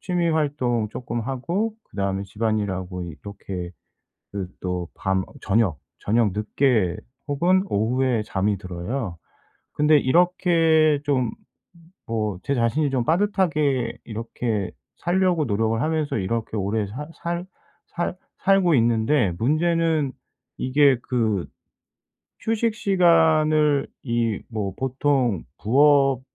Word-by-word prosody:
취미 175 -2 0
활동 130 -8 0
쪼끔 120 0 -4
하고 170 - -2 0.2
그다음에 100 -1 -2
집안일하고 100 -4 -2
이렇게 90 +1 -7 0.6
그 100 -2 -3
또 90 -2 -3
밤 95 0 0
어 - - -17
저녁, 95 - +1 0.2
저녁 110 -1 +1
늦게 105 -3 +1 0.3
혹은 175 +6 +3
오후에 120 +2 +1
잠이 100 +1 0
들어요. 95 +2 -4 0.6
근데 150 +1 +4
이렇게 165 -1 +3
좀 130 -4 +1 0.8
뭐 105 -4 -2
제 140 - 0
자신이 125 +6 +1
좀 130 -3 0
빠듯하게 155 - +1
이렇게 110 -2 -3 0.3
살려고 175 -1 +1
노력을 110 +2 0
하면서 155 -3 0
이렇게 110 +3 -2
오래 105 +2 -1
살 145 +9 -7
살 170 +1 -4 0.4
살 175 0 -3 0.2
살고 190 -4 +4
있는데 115 -2 +2
문제는 160 +2 +1 0.5
이게 135 0 +4
그 110 -7 0 0.9
휴식 225 0 0
시간을 160 -6 +3 0.2
이 115 -4 -1
뭐 105 -5 -3
보통 130 - 0 0.2
부업 135 +2 +4
125 Hz, 225 characters per minute, -23 LUFS, 105-155 Hz, 0.9 s, 근데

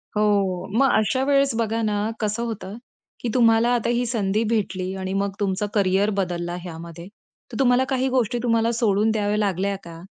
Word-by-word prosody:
हो. 200 -4 +1
मग 270 +1 +4
अशा 220 +5 +1
वेळेस 275 -1 +3
बघा 225 0 -1
ना, 210 -1 0 0.2
कसं 215 +2 -1
होतं, 205 -4 -6 0.4
की 240 - -3
तुम्हाला 230 -1 +4
आता 235 -1 -1
ही 245 - 0
संधी 215 -2 0
भेटली 190 -4 -1
आणि 190 0 -3
मग 200 0 0
तुमचं 205 +1 -1
करियर 195 0 +2
बदलला 175 -2 -2
ह्यामध्ये. 170 0 -9 0.4
तर 225 - -6
तुम्हाला 250 -1 +4
काही 265 -1 +1
गोष्टी 245 -2 0
तुम्हाला 230 -1 +2
सोडून 220 -2 +2
द्याव्या 210 -1 0
लागल्या 200 -1 0
का? 165 -1 -10
210 Hz, 170 wpm, -23 LUFS, 190-235 Hz, 0.4 s, मग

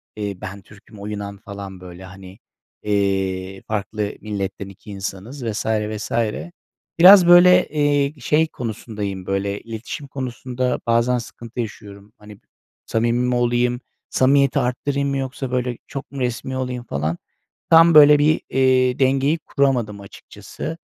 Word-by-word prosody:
eee, 100 -2 -4
ben 100 +2 -7
Türk'üm, 105 +2 -17
o 100 - -8
Yunan 100 -1 -6
falan 100 -2 -9
böyle, 90 0 -11
hani, 95 +2 -13 0.4
eee, 95 -2 -1
farklı 105 0 -3
milletten 100 -2 -5
2 100 +2 -13
insanız 100 +7 -6
vs. 110 -2 -3
vs. 110 -1 -2 0.9
Biraz, 185 +1 +9
böyle, 175 +1 +7
eee, 145 -1 0
şey 155 +5 +2
konusundayım, 105 -6 -6
böyle, 100 +1 -2
iletişim 115 +6 -7
konusunda 130 -1 -3
bazen 115 +2 +2
sıkıntı 120 0 -9
yaşıyorum. 105 -2 -7
Hani, 105 -1 -14 0.5
samimi 120 +2 0
mi 125 - 0
olayım, 120 0 +1 0.3
samimiyeti 140 +1 +3
arttırayım 140 +3 -1
mı 140 - -1
yoksa, 135 -1 -4
böyle, 125 -1 -1
çok 140 0 -8
mu 140 - -7
resmî 125 +1 -3
olayım 125 -1 -4
falan. 80 - -3 0.5
Tam 165 +1 +7
böyle 150 -1 +8
bir, 155 +2 +3
eee, 130 -1 +2
dengeyi 135 +3 +2
kuramadım 125 -9 -1
açıkçası. 155 +10 -9
120 Hz, 135 wpm, -21 LUFS, 100-135 Hz, 0.9 s, Biraz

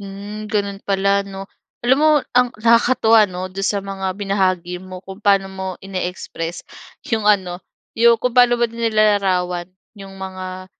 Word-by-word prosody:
Hmm, 205 +2 -8
ganun 200 -2 -2
pala, 200 0 +2
'no? 195 0 -8 0.4
Alam 260 +3 +4
mo, 310 0 +5 0.2
ang 250 0 +4
nakakatuwa, 230 -1 +4
'no, 185 0 -6
dun 195 - -5
sa 200 0 0
mga 190 -1 -4
binahagi 185 -3 -1
mo 185 -1 -9
kung 190 +2 -10
paano 195 -2 +3
mo 190 0 -5 0.2
ini-express 180 -3 -5 0.5
yung 220 -2 +1
ano, 185 -3 +1 0.3
yung 235 0 +5
kung 250 +2 -2
paano 245 0 +5
mo 240 - +1
nilalarawan 205 -6 +1 0.3
yung 195 -1 -11
mga, 185 -1 -7
195 Hz, 150 wpm, -19 LUFS, 185-215 Hz, 0.5 s, mo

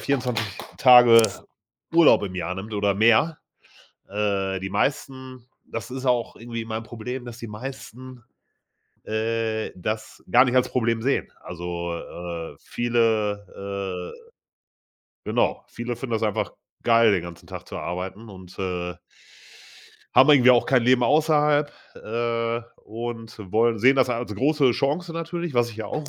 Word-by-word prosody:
24 125 -5 -1 0.3
Tage 120 -3 +8 0.7
Urlaub 165 -8 +6
im 95 -2 -4
Jahr 90 0 -3
nimmt 105 +4 -7
oder 100 -1 +1
mehr. 115 +9 +3 0.7
Äh, 100 -2 -1
die 95 - -5
meisten 130 +2 -3 0.2
das 115 -1 -6
ist 130 +1 -6
auch 125 -3 0
irgendwie 115 0 -6
mein 110 0 -4
Problem, 120 +3 -7
dass 120 -1 -9
die 115 - -7
meisten, 125 +2 -9 0.8
äh, 110 0 -2
das 110 +4 -5
gar 125 +1 +7
nicht 130 -1 -1
als 125 - +4
Problem 115 -2 0
sehen. 135 +3 -1
Also, 85 0 -5
äh, 85 -2 -7
viele 110 -4 0 0.7
äh, 465 0 -17 0.9
genau, - - 0
viele 120 +1 -5
finden 120 -1 -4
das 110 - 0
einfach 105 -2 -1 0.3
geil, 115 -2 +5
den 90 -4 +1
ganzen 85 -1 -10
Tag - - -9
zu - - -6
arbeiten 95 +5 -5
und, 95 -2 -13
äh 90 -2 -3 1.2
haben - - +7
irgendwie 130 -4 +7
auch 120 -1 +4
kein 130 -3 +3
Leben 125 0 +4
außerhalb, 150 0 +3 0.2
äh, 115 +1 -2 0.2
und 115 -3 -7
wollen 115 +1 +3
sehen 130 +6 +5
das 130 -2 +3
als 120 -3 -3
große 135 +2 +2
Chance 150 +8 -1
natürlich, 165 -2 -4
was 120 0 +2
ich 110 - -12
ja 110 -2 -5
auch 150 +6 -5
115 Hz, 145 wpm, -24 LUFS, 105-130 Hz, 1.2 s, Tage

